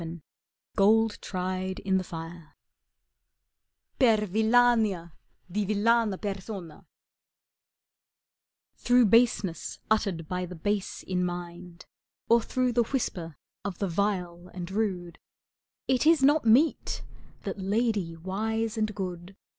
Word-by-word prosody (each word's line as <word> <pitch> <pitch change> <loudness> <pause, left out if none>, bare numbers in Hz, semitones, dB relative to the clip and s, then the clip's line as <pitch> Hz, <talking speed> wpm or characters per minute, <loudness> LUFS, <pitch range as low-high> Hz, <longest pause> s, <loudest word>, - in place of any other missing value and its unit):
^^^ - - -4
^ 165 - -5
u 170 - -11 0.6
GOLD 220 +2 +3
TRIED 185 0 -3
IN 190 -1 +1
THE - - -3
FIRE 165 -1 -9 1.4
Per 225 -5 +4
wllania 220 -4 +3 0.4
di 210 +3 0
villana 215 0 +2
persona 195 -4 -6 1.9
Through 245 0 +4
baseness 210 -6 +2
uttered 195 -7 0
by 180 0 -3
the 180 - -8
base 200 +4 -2
in 180 -1 -1
mind, 175 0 -6 0.4
Or 235 0 +6
through 255 +1 0
the 240 - +3
whisper 175 - -3 0.3
of 200 -4 -4
the 200 - -1
vile 180 -1 -2
and 180 0 -6
rude, 185 -5 -2 0.7
It 260 +3 +2
is 320 -4 +5
not 290 0 +4
meet 260 +8 +3 0.4
that - - -5
lady 200 -3 0
wise 220 +6 -2
and 215 -1 -1
good. 185 -1 -6
200 Hz, 120 wpm, -28 LUFS, 180-225 Hz, 1.9 s, Or